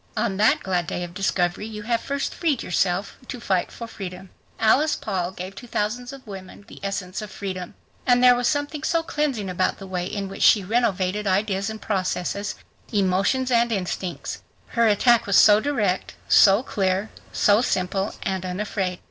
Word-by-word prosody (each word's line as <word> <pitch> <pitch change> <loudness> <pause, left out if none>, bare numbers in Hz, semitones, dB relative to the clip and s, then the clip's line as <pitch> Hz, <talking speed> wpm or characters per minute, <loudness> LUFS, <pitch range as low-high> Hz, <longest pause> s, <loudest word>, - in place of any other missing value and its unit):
On 215 -3 0
that 215 +2 +4
glad 180 -3 -1
day 175 - -3
of 175 -1 -7
discovery 185 +1 0
you 210 -1 -7
have 230 +1 0
first 280 0 -2
freed 305 -7 0
yourself 180 +2 0
to 250 - -6
fight 190 -6 0
for 235 - -7
freedom. 190 -4 -8 0.3
Alice 280 +8 +4
Paul 185 -4 -2
gave 185 +1 -7
to 245 - -9
thousands 240 +3 -2
of 275 -1 -11
women 195 -1 -10
the - - -12
essence 195 -1 -4
of 210 - -7
freedom. 185 -3 -6 0.3
And 245 0 +4
there 250 0 +8
was 245 0 0
something 290 +2 -1
so 330 0 +1
cleansing 290 -10 -1
about 185 0 0
the 195 - -9
way 180 -1 -3
in 200 0 -4
which 195 - -8
she 205 - +6
renovated 205 -2 0
ideas 195 +1 +1
and 220 0 -6
processes, 195 0 -2 0.4
emotions 200 +6 +1
and 235 0 +3
instincts. 185 -3 -3 0.3
Her 230 -1 +2
attack 235 +2 +4
was 200 - +2
so 210 0 +7
direct, 215 -8 -1
so 200 +4 +6
clear, 195 -3 -1 0.2
so 205 +2 +4
simple 190 -2 -1
and 190 -1 -2
unafraid. 185 0 -2
200 Hz, 175 wpm, -24 LUFS, 185-235 Hz, 0.4 s, there